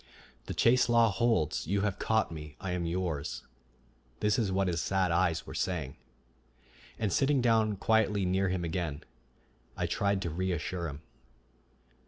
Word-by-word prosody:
"The - - -4
chase 125 +1 +4
law 115 -2 +5
holds. 115 -11 +1
You 100 +3 +1
have 105 -1 -1
caught 110 -5 +1
me; 75 -2 -8
I 95 - -4
am 90 -1 -2
yours," 85 -4 -3 0.8
this 105 +3 +2
is 105 -5 0
what 95 0 +1
his 85 -2 0
sad 95 -2 +1
eyes 85 -1 +1
were - - -8
saying. 80 -8 -2 1.0
And 105 -5 -1
sitting 140 0 +3
down 110 -3 +3
quietly 105 -2 +2
near 95 +1 +1
him 90 -1 -1
again, 80 -3 -3 0.7
I - - 0
tried 100 -1 0
to 85 - -3
reassure 90 0 -2
him. 70 0 -8
95 Hz, 155 wpm, -30 LUFS, 85-105 Hz, 1.0 s, law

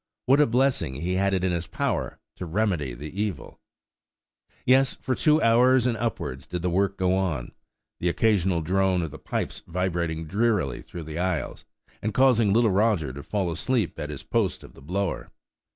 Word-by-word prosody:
–What 135 +3 +5
a 150 - +4
blessing 120 - +1
he 85 +6 -2
had 100 +1 +1
it 90 - -1
in 95 - +1
his 85 -1 -2
power - - -2 0.2
to 90 - -5
remedy 85 - -1
the 75 +9 -5
evil! 105 -3 -4 1.1
Yes; 130 +1 +4
for 130 - -2
two 150 +4 +3
hours 125 +2 +5
and 125 -2 +1
upwards 105 - -4
did 90 -1 -4
the 90 - 0
work 100 +2 +1
go 95 0 +2
on; 85 -10 -2 0.5
the 90 - +1
occasional 95 -2 +2
drone 95 +1 +1
of 80 - -4
the 80 - -10
pipes - - -3
vibrating 85 -2 -2
drearily 100 - 0
through 85 - -8
the 80 +2 -6
aisles, 90 -7 -2 0.4
and 105 -1 -3
causing 120 -6 +4
little 115 0 +4
Roger 95 - +1
to 70 - -7
fall 95 +1 -2
asleep 105 +2 -1
at 75 - -4
his 75 -2 -6
post - - -1
of - - -13
the - - -16
blower. 95 +6 -3
95 Hz, 185 wpm, -25 LUFS, 85-110 Hz, 1.1 s, What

